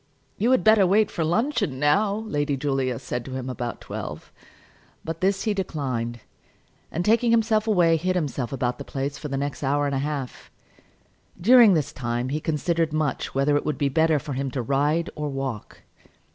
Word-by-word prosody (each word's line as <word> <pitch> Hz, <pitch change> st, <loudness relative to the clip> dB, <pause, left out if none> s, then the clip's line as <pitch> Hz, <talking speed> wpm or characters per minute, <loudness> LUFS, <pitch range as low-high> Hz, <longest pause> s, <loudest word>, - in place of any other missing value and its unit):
"You 225 Hz, +5 st, +2 dB
had 260 Hz, -1 st, +3 dB
better 215 Hz, -3 st, +5 dB
wait 210 Hz, +3 st, +3 dB
for 165 Hz, -, -2 dB
luncheon, 200 Hz, -, 0 dB
now," 200 Hz, +8 st, +2 dB
Lady 145 Hz, -6 st, -1 dB
Julia 135 Hz, -3 st, -1 dB
said 120 Hz, +1 st, -4 dB
to 130 Hz, -, -7 dB
him 130 Hz, -1 st, -4 dB
about 120 Hz, -1 st, -5 dB
twelve. -, -, -7 dB, 0.7 s
But 165 Hz, 0 st, -5 dB
this 195 Hz, +1 st, +1 dB
he 215 Hz, -, +1 dB
declined; 130 Hz, -, -3 dB, 0.7 s
and 170 Hz, +2 st, -2 dB
taking 230 Hz, +2 st, +3 dB
himself 225 Hz, -1 st, +2 dB
away 175 Hz, -6 st, +4 dB
hid 185 Hz, +3 st, -1 dB
himself 140 Hz, -8 st, -2 dB
about 125 Hz, -2 st, -2 dB
the -, -, -5 dB
place 140 Hz, +1 st, -4 dB
for 150 Hz, -, -5 dB
the 135 Hz, -1 st, -3 dB
next 140 Hz, 0 st, -3 dB
hour 145 Hz, +1 st, +1 dB
and 140 Hz, -, -1 dB
a 135 Hz, -, 0 dB
half. 140 Hz, -2 st, -4 dB, 0.9 s
During 230 Hz, 0 st, +7 dB
this 155 Hz, -4 st, -1 dB
time 120 Hz, 0 st, -2 dB
he 150 Hz, +3 st, -2 dB
considered 160 Hz, +1 st, 0 dB
much 155 Hz, -4 st, -2 dB
whether 140 Hz, +2 st, +2 dB
it 145 Hz, -, +1 dB
would 150 Hz, -3 st, -2 dB
be 140 Hz, -, +1 dB
better 160 Hz, +2 st, +3 dB
for 145 Hz, 0 st, -5 dB
him 135 Hz, +1 st, -2 dB
to 130 Hz, -1 st, -3 dB
ride 145 Hz, +6 st, 0 dB
or 150 Hz, -1 st, -4 dB
walk. 135 Hz, -6 st, -5 dB
150 Hz, 185 wpm, -24 LUFS, 135-185 Hz, 0.9 s, During